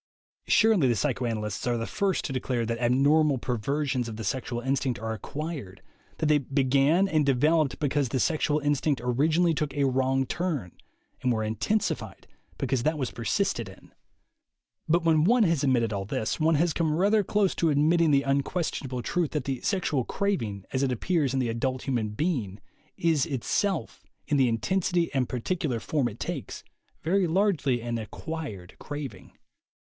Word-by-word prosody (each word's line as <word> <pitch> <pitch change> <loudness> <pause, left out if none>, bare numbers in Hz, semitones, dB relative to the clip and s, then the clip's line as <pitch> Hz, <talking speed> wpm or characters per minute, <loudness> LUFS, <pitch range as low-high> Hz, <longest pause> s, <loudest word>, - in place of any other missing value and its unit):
Surely 215 -11 +4
the 120 - +2
psychoanalysts 110 -2 -2
are 120 -1 +1
the 115 - -2
first 200 -3 -1
to 135 - -3
declare 125 -2 -1
that 115 +1 -2
abnormal 140 +4 +3
perversions 130 +1 -1
of 110 - -7
the 110 - -5
sexual 120 +2 -2
instinct 130 -2 -1
are 110 0 -3
acquired, 140 - -6 0.4
that - - -1
they 150 -1 +4
began 140 +6 +2
and 155 -6 +2
developed 150 +2 +2
because 145 -3 0
the 130 - -1
sexual 150 +6 +1
instinct 145 -1 0
orginally 155 +8 +2
took 150 -2 -2
a 140 -1 +2
wrong 135 0 +1
turn, 150 - -2 0.5
and 125 - +1
were 110 -2 0
intensified 110 - -2 0.3
because 130 -3 -1
that 155 +2 +1
was 130 -4 -2
persisted 115 -4 -1
in. - - -16 1.0
But 165 +1 +2
when 160 -2 +4
one 235 +6 +4
has 165 -6 +1
admitted 120 -5 +2
all 100 -1 -2
this, 110 +2 -2
one 160 0 +3
has 165 +2 +2
come 160 -2 0
rather 205 +3 +3
close 200 0 +1
to 165 - +2
admitting 155 +3 +3
the 140 -1 +3
un 140 +1 +2
questionable 135 -6 -3
truth 175 -4 -1
that 150 -4 -2
the 135 -3 -3
sexual 175 - 0
craving, 115 - -2
as 130 +1 +1
it 135 - +1
appears 140 +2 0
in 135 - +1
the 125 - 0
adult 130 +3 -2
human 120 -5 -1
being, 105 - -2 0.4
is 160 -5 +2
itself, 165 - -1 0.2
in 150 - +1
the 130 -3 +4
in 115 - +1
tensity 180 +2 0
and 130 -3 0
particular 130 0 -2
form 135 +1 0
it 110 - -12
takes, - - -5 0.4
very 185 +4 +2
largely 160 - +1
an 120 0 -3
"acquired" 110 - -7
craving. 140 -10 -7
140 Hz, 170 wpm, -27 LUFS, 120-160 Hz, 1.0 s, Surely